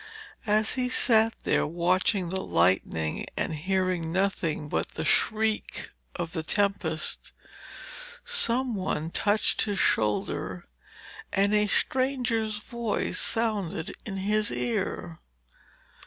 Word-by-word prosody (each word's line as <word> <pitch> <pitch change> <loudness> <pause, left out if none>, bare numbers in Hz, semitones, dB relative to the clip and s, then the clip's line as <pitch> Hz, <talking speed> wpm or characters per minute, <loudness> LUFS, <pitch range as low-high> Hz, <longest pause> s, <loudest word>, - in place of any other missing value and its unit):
As 215 +1 +3
he 250 -1 0
sat 225 -3 +5
there - - +2
watching 180 +3 +1
the 190 +1 -1
lightning 85 - +1
and - - -1
hearing 185 0 -1
nothing 170 -5 -1
but - - -2
the 160 - -2
shriek 220 +6 0 0.2
of 170 -2 -4
the 165 - -2
tempest, 175 -3 -1 0.9
some 260 - +1
one 175 -5 -2
touched 205 +4 +2
his 205 -2 -2
shoulder 105 - 0 0.6
and 200 +2 +2
a 210 0 +3
stranger's 245 -3 0
voice 230 +1 -2
sounded 205 -8 -1
in 195 -3 -5
his 210 +2 +1
ear. 190 -7 -2
200 Hz, 110 wpm, -27 LUFS, 170-220 Hz, 0.9 s, sat